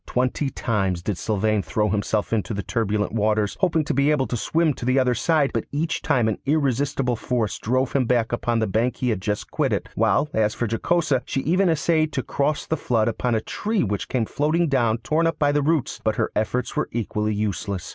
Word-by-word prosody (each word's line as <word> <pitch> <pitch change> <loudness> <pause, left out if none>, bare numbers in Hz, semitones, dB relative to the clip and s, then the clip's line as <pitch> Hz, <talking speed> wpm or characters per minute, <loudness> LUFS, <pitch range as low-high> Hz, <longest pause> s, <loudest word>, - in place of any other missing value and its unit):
Twenty 130 +3 0
times 95 -9 -1
did 95 -3 -2
Sylvain 110 0 +1
throw 105 +2 0
himself 105 +2 -1
into 110 0 -1
the 100 - -3
turbulent 105 -1 -1
waters, 105 -1 +1
hoping 165 -5 +2
to - - -2
be 140 +2 +2
able 150 -3 +2
to 125 - -3
swim 160 +6 +1
to - - -9
the 130 +2 +2
other 130 -2 +3
side, 150 +3 +2
but - - -1
each 155 +2 -1
time 120 -4 +2
an 110 - -1
irresistible 135 -3 0
force 115 -1 -2
drove 130 +3 0
him 135 -3 +2
back 120 -2 +1
upon 120 0 0
the 110 - +1
bank 115 +4 0
he 125 - -1
had 105 - -2
just 105 +2 -3
quitted, - - 0
while, 150 - +2
as 110 0 +1
for 120 - -1
Jocosa, 140 +4 +1
she 135 - -2
even 180 +6 +2
essayed 155 -1 +1
to 130 - -1
cross 145 +1 -1
the 160 - -1
flood 115 -5 +1
upon 120 +1 -1
a 110 - 0
tree 215 - -1
which 100 -4 -3
came 120 -3 0
floating 155 +8 +1
down 120 -5 +2
torn 160 +7 +1
up 165 - -1
by 145 -1 +2
the 145 0 +2
roots, 155 -1 0
but 110 -1 +1
her - - -1
efforts 115 +3 -1
were - - -1
equally 105 -2 -1
useless. 100 -2 -3
120 Hz, 215 wpm, -23 LUFS, 110-145 Hz, -, other